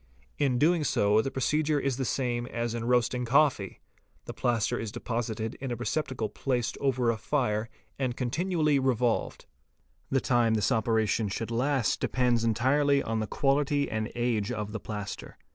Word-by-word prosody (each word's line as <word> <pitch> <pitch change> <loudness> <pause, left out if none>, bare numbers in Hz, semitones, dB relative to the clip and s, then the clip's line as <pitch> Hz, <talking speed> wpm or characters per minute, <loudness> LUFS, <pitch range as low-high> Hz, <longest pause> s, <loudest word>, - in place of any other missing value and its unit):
In 135 -4 +2
doing 160 +4 +3
so 105 -5 +3
the 135 - -2
procedure 150 +3 +1
is 135 -3 -1
the 135 - -1
same 120 -2 -1
as 120 -1 -3
in 115 -1 -3
roasting 125 0 +1
coffee; 130 -6 +2 0.4
the - - -6
plaster 120 -3 0
is 110 -2 -4
deposited 115 -1 -3
in 135 - -3
a - - -1
receptacle 120 -2 -2
placed 125 0 -2
over 130 -4 +2
a 115 - -3
fire 110 0 -1 0.3
and 125 -3 -1
con 125 -2 -2
tinually 155 -4 +1
revolved. 125 -3 0 0.6
The 135 - +2
time 120 -3 +2
this 105 +3 +1
operation 110 -2 +1
should 115 +4 -4
last 130 +1 +1
depends 125 -3 +1
entirely 135 +5 +2
on 115 0 -2
the 110 - -2
quality 145 +2 +1
and 110 0 -2
age 120 -3 0
of 105 -3 -4
the 110 - -4
plaster. 105 -1 -6
120 Hz, 165 wpm, -28 LUFS, 110-135 Hz, 0.6 s, doing